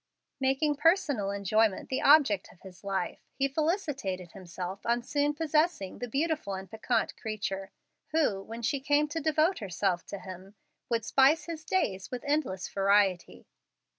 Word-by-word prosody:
Making 270 +2 +1
personal 305 - +2
enjoyment 200 +1 +1
the 260 - -1
object 280 -10 +5
of 180 - -22
his 185 -1 -13
life, 195 -2 -2
he 275 - +1
felicitated 275 - -2
himself 185 +1 -7
on 235 +1 0
soon 290 +3 0
possessing 310 - 0
the 245 - -4
beautiful 285 - -1
and 190 0 -7
piquant 220 +4 -1
creature, 195 -3 -4 0.4
who, 295 -12 +1
when 230 +3 -8
she 280 +4 0
came 290 +2 +2
to 325 +2 -3
devote 315 +4 +2
herself 190 -3 -1
to 200 - -5
him, 190 +1 -10 0.3
would 230 -2 0
spice 280 +6 +4
his 320 -1 -6
days 195 - -1
with 250 -1 -5
endless 285 -11 -1
variety. 195 - +1
230 Hz, 150 wpm, -29 LUFS, 195-295 Hz, 0.4 s, object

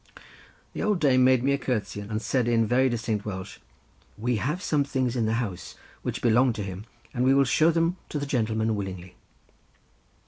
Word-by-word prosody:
The - - -4
old 210 -3 +1
dame 130 -4 +4
made 130 -1 +4
me 140 - +2
a 140 - +1
curtsey 105 -7 -2
and 105 +1 -4
said 125 +1 0
in 115 -1 +3
very 130 +4 +3
distinct 115 -3 -2
Welsh, 95 -2 -6 0.6
"We 120 +2 0
have 150 +11 -1
some 150 -2 +1
things 130 -3 -1
in 115 -3 +1
the 110 - +1
house 100 -7 -4 0.3
which - - -4
belonged 120 +1 +4
to 105 - -3
him, 95 +1 -7 0.3
and 125 - 0
we 135 +1 +4
will 140 - +5
show 155 +5 +3
them 165 +2 +1
to - - -3
the 145 - -2
gentleman 110 -4 0
willingly." 95 -3 -6
120 Hz, 195 wpm, -26 LUFS, 110-135 Hz, 0.6 s, will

